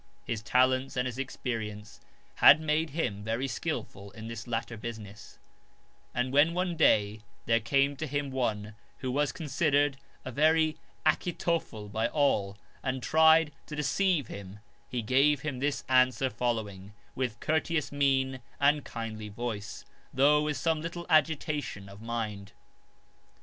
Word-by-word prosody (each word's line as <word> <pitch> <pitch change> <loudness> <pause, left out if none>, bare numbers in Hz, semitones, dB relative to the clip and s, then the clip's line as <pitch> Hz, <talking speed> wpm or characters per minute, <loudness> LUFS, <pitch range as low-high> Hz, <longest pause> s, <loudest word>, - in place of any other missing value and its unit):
His 115 -2 -3
talents 130 +4 +2
and 125 - +1
his 125 0 -4
experience 110 -5 -5 0.4
had - - +8
made 155 +1 0
him 105 -10 -2
very 115 +5 -1
skilful 100 -3 -4
in 110 0 -8
this 115 -1 -7
latter 115 0 -3
business; 105 -2 -9 0.7
and 125 +2 -2
when 155 +4 +4
one 180 -1 -1
day 105 -8 +3 0.2
there 115 0 +3
came 140 +5 +1
to 155 - -3
him 145 0 -2
one, 110 -5 -2 0.2
who 130 - -3
was 145 +2 +1
considered 145 -4 +1 0.3
a 130 - -4
very 155 +3 +3 0.3
Achitophel 165 - 0
by 110 +3 -1
all, 105 -9 +1 0.2
and 130 -1 -3
tried 160 0 +5 0.2
to 150 - -6
deceive 160 +1 +1
him 100 -1 -9 0.3
he 120 -2 -3
gave 135 +5 +3
him 145 -4 -4
this 145 +1 -1
answer 130 0 +3
follow 115 -2 -1
ing, 100 0 -12 0.2
with 125 -3 -3
courteous 160 0 0
mien 135 -2 +1 0.2
and 145 +1 +3
kindly 110 -2 -6
voice, 105 -2 -5 0.3
though 145 +3 +4
with 150 -1 -1
some 160 -2 0
little 170 +1 -5
agitation 150 -8 +1
of 100 +1 -12
mind. 110 -4 -4
130 Hz, 145 wpm, -29 LUFS, 110-150 Hz, 0.7 s, had